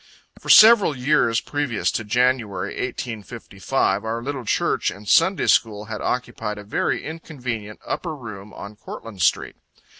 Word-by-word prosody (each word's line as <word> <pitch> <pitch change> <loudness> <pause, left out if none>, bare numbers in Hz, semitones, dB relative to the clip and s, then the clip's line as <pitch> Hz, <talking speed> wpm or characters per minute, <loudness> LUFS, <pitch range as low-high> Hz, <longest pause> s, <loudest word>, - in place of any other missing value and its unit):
For - - -10
several 215 - +7
years 125 -4 +2
previous 145 -7 -1
to 110 - -3
Jan., 125 +4 +2
1855, 110 0 -3
our 115 +1 -3
little 135 -2 -5
church - - 0
and 100 +1 -10
Sunday 185 - +3
school 105 -2 +2
had 110 -1 -6
occupied 115 -4 -3
a 105 - -8
very 105 - -2
inconvenient 125 -9 -6
upper 165 -3 -4
room 105 -6 -9
on 100 +2 -10
Courtland 110 -2 -9
street. - - +1
115 Hz, 140 wpm, -22 LUFS, 105-135 Hz, -, several